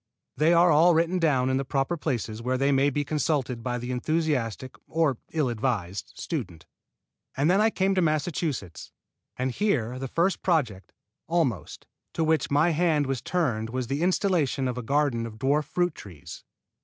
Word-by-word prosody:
They 155 Hz, +4 st, +3 dB
are 175 Hz, 0 st, +5 dB
all 165 Hz, +3 st, +5 dB
written 170 Hz, +3 st, +1 dB
down 130 Hz, -6 st, +2 dB
in 130 Hz, -, +1 dB
the 135 Hz, -, -1 dB
proper 135 Hz, +4 st, -1 dB
places 115 Hz, -7 st, -3 dB
where 130 Hz, +2 st, -1 dB
they 135 Hz, +2 st, +2 dB
may 135 Hz, +1 st, +3 dB
be 145 Hz, +1 st, -2 dB
consulted 145 Hz, -5 st, -1 dB
by 125 Hz, 0 st, -2 dB
the 125 Hz, +1 st, -5 dB
enthusiastic 130 Hz, -3 st, -1 dB
or 155 Hz, -7 st, +1 dB
ill 155 Hz, -4 st, 0 dB
advised 110 Hz, -6 st, -3 dB
student. 80 Hz, -2 st, -5 dB, 0.7 s
And 145 Hz, +5 st, +3 dB
then 195 Hz, +3 st, +4 dB
I 220 Hz, -, +4 dB
came 195 Hz, -2 st, +1 dB
to 185 Hz, -, +2 dB
Massachusetts; 155 Hz, -, -2 dB, 0.5 s
and 130 Hz, +1 st, -1 dB
here 130 Hz, -, -1 dB
the 135 Hz, -, -4 dB
first 170 Hz, +7 st, 0 dB
project, 130 Hz, -, 0 dB, 0.4 s
almost, 145 Hz, -, -1 dB, 0.3 s
to 165 Hz, -, +1 dB
which 160 Hz, 0 st, +1 dB
my 150 Hz, +4 st, +3 dB
hand 160 Hz, -2 st, +2 dB
was 135 Hz, -2 st, -2 dB
turned 120 Hz, -11 st, -1 dB
was 130 Hz, +1 st, -3 dB
the 140 Hz, +5 st, -2 dB
installation 175 Hz, -7 st, +1 dB
of 125 Hz, -, -2 dB
a -, -, -3 dB
garden 130 Hz, -2 st, 0 dB
of 110 Hz, -, -10 dB
dwarf 140 Hz, +4 st, +1 dB
fruit 175 Hz, +3 st, 0 dB
trees. 85 Hz, -, -11 dB
140 Hz, 175 wpm, -26 LUFS, 125-165 Hz, 0.7 s, are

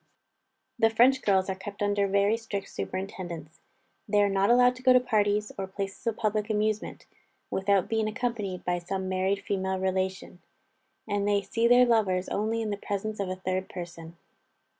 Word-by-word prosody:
The 225 Hz, -1 st, +5 dB
French 250 Hz, +4 st, +4 dB
girls 190 Hz, -2 st, +2 dB
are 190 Hz, -, -1 dB
kept 200 Hz, +2 st, -6 dB
under 205 Hz, -1 st, +1 dB
very 200 Hz, +2 st, +3 dB
strict 220 Hz, -3 st, -5 dB
superintendence. 175 Hz, -4 st, -6 dB, 0.5 s
They 205 Hz, 0 st, +4 dB
are 200 Hz, -, +2 dB
not 195 Hz, 0 st, +2 dB
allowed 250 Hz, +1 st, +5 dB
to -, -, -11 dB
go 255 Hz, 0 st, +6 dB
to 255 Hz, -, +7 dB
parties, 210 Hz, -3 st, +1 dB
or 190 Hz, -, -3 dB
places 195 Hz, +3 st, -6 dB
of 225 Hz, -, 0 dB
public 215 Hz, -1 st, -1 dB
amusement, 215 Hz, 0 st, -1 dB, 0.5 s
without 195 Hz, -1 st, +2 dB
being 220 Hz, -1 st, 0 dB
accompanied 215 Hz, -5 st, -3 dB
by 175 Hz, 0 st, 0 dB
some 190 Hz, +2 st, -4 dB
married 190 Hz, +1 st, 0 dB
female 190 Hz, -1 st, -1 dB
relation; 190 Hz, -1 st, -2 dB, 0.7 s
and 205 Hz, -1 st, 0 dB
they 200 Hz, -1 st, +2 dB
see 230 Hz, +4 st, +1 dB
their 245 Hz, +1 st, +6 dB
lovers 200 Hz, -6 st, +1 dB
only 225 Hz, +2 st, -1 dB
in 215 Hz, -, -3 dB
the 205 Hz, -, -2 dB
presence 205 Hz, +1 st, -4 dB
of 195 Hz, -2 st, -2 dB
a 185 Hz, -, -2 dB
third 185 Hz, 0 st, -3 dB
person. 170 Hz, -2 st, -8 dB
200 Hz, 175 wpm, -28 LUFS, 190-220 Hz, 0.7 s, to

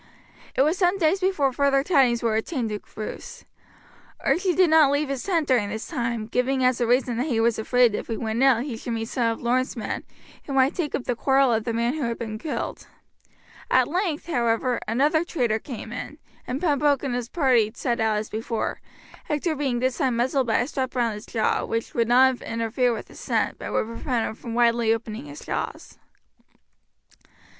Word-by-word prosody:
It 265 Hz, -, +4 dB
was 315 Hz, +5 st, +1 dB
some 360 Hz, +1 st, +3 dB
days 350 Hz, +1 st, +2 dB
before 365 Hz, -9 st, +1 dB
further 275 Hz, 0 st, +2 dB
tidings 265 Hz, -8 st, +3 dB
were 225 Hz, -2 st, +1 dB
obtained 225 Hz, 0 st, -2 dB
of 210 Hz, -, -4 dB
Bruce. 215 Hz, 0 st, -7 dB, 0.8 s
Archie 350 Hz, +6 st, +1 dB
did 365 Hz, -3 st, +4 dB
not 315 Hz, -3 st, +6 dB
leave 285 Hz, 0 st, 0 dB
his 275 Hz, -2 st, -2 dB
tent 335 Hz, -6 st, 0 dB
during 235 Hz, -6 st, +2 dB
this 220 Hz, +2 st, -5 dB
time, 235 Hz, -2 st, -2 dB
giving 255 Hz, +3 st, 0 dB
as 255 Hz, -1 st, +2 dB
a 240 Hz, -, +2 dB
reason 245 Hz, -1 st, +2 dB
that 255 Hz, +5 st, -1 dB
he 235 Hz, -6 st, 0 dB
was 230 Hz, 0 st, +2 dB
afraid 245 Hz, 0 st, +3 dB
if -, -, -4 dB
he 225 Hz, -, -3 dB
went 225 Hz, +1 st, -2 dB
out 260 Hz, -3 st, +4 dB
he 270 Hz, -5 st, -5 dB
should 235 Hz, +1 st, -5 dB
meet 225 Hz, 0 st, -3 dB
some 240 Hz, -2 st, 0 dB
of 225 Hz, -, -6 dB
Lorne's 255 Hz, +2 st, 0 dB
men, 225 Hz, -, -4 dB, 0.4 s
who 280 Hz, -, -5 dB
might 265 Hz, +1 st, +3 dB
take 320 Hz, -5 st, -2 dB
up 260 Hz, -, -3 dB
the 245 Hz, -, -1 dB
quarrel 270 Hz, 0 st, +3 dB
of 220 Hz, 0 st, 0 dB
the 235 Hz, -, -1 dB
man 235 Hz, +2 st, 0 dB
who 310 Hz, -, -4 dB
had 235 Hz, 0 st, -2 dB
been 215 Hz, -2 st, -5 dB
killed. 305 Hz, -, -4 dB, 0.8 s
At 255 Hz, -1 st, +4 dB
length, 345 Hz, -2 st, -1 dB
however, 240 Hz, -4 st, 0 dB
another 295 Hz, +7 st, +2 dB
traitor 240 Hz, -10 st, 0 dB
came 230 Hz, -2 st, -8 dB
in, 255 Hz, +4 st, -6 dB, 0.3 s
and 255 Hz, +2 st, -2 dB
Pembroke 290 Hz, -4 st, +2 dB
and 270 Hz, -3 st, -2 dB
his 245 Hz, -1 st, -3 dB
party 255 Hz, -9 st, +2 dB
set 240 Hz, -2 st, -1 dB
out 220 Hz, -1 st, +2 dB
as 210 Hz, +1 st, -3 dB
before, 225 Hz, +1 st, -3 dB, 0.4 s
Hector 310 Hz, +2 st, -1 dB
being 270 Hz, -4 st, -1 dB
this 255 Hz, +3 st, -1 dB
time 260 Hz, -5 st, +1 dB
muzzled 255 Hz, +2 st, +1 dB
by 225 Hz, -, +2 dB
a 245 Hz, -, -2 dB
strap 265 Hz, -4 st, -3 dB
round 235 Hz, -3 st, +1 dB
his 210 Hz, +1 st, -9 dB
jaw, 220 Hz, -2 st, 0 dB
which 230 Hz, 0 st, -3 dB
would 230 Hz, -1 st, +1 dB
not 255 Hz, +1 st, +4 dB
interfere 230 Hz, +2 st, 0 dB
with 230 Hz, -, -5 dB
his -, -, -13 dB
scent, -, -, -1 dB
but -, -, -6 dB
would -, -, +1 dB
prevent 230 Hz, +1 st, -2 dB
him -, -, -4 dB
from 230 Hz, +1 st, -7 dB
widely 235 Hz, -1 st, +3 dB
opening 225 Hz, +3 st, -3 dB
his 295 Hz, +1 st, -10 dB
jaws. -, -, -5 dB
250 Hz, 205 wpm, -24 LUFS, 230-280 Hz, 0.8 s, not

